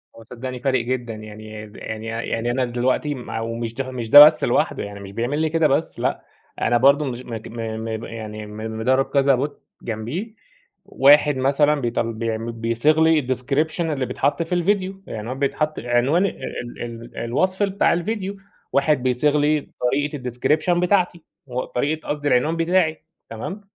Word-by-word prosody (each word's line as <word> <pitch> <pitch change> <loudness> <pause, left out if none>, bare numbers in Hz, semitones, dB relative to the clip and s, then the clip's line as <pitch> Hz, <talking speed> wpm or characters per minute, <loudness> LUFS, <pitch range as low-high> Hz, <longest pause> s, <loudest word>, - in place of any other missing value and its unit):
هو 115 - -13
صدّقني 125 +2 -7
فارق 130 -1 +1
جدًا، 120 -2 -2
يعني 110 0 -9
د 105 - -18
يعني 110 0 -6
يعني 115 +1 -2
أنا 130 +1 0
دلوقتي 125 +4 0
ما 120 -3 -6
أو 115 +1 -3
مش 115 -1 -4
مش 125 -4 -5
ده 145 +3 +12
بس 155 - +3
لوحده - - +1
يعني، 100 0 -8
مش 100 0 -9
بيعمل 120 +7 -2
لي 160 0 +1
كده 165 -1 +3
بس، 150 +4 -1
لأ، - - -1 0.4
أنا 120 - +3
برضه 140 +4 +4
مش 125 -1 -5
مج 115 -2 -6
م - - -11 0.3
م 115 0 -4
يعني 110 -2 -7
م 110 +1 -6
مدرّب 130 +4 +2
كذا 140 -2 +3
Bot - - -15 0.3
جنبيه، 120 - -4 0.5
واحد 145 0 +5
مثلًا 140 +3 +3
بيطل 115 -1 -1
بيعمل 115 0 -3
بيصيغ 115 +7 +1
لي 160 -1 +5
الdescription 135 +6 -1
اللي 150 -6 -1
بيتحط 145 +6 0
في 165 +2 -2
الڤيديو، 195 0 -1
العنوان 115 +5 -5
بيتحط 150 +2 -1
عنوان 125 +10 +2
ال 120 -9 -5
ال 115 0 -8
الوصف 185 - 0
بتاع 200 -2 +2
الڤيديو، 195 +2 -3 0.4
واحد 140 -1 +2
بيصيغ 130 +4 +2
لي 150 0 +1
طريقة 145 +4 0
الdescription 150 +8 +1
بتاعتي، 180 -2 +1 0.2
و 125 0 -3
طريقة 150 +5 -2
قصدي 145 0 -2
العنوان 145 +5 +2
بتاعي، 165 -2 +1 0.3
تمام؟ 180 - -6
130 Hz, 170 wpm, -22 LUFS, 115-155 Hz, 0.5 s, ده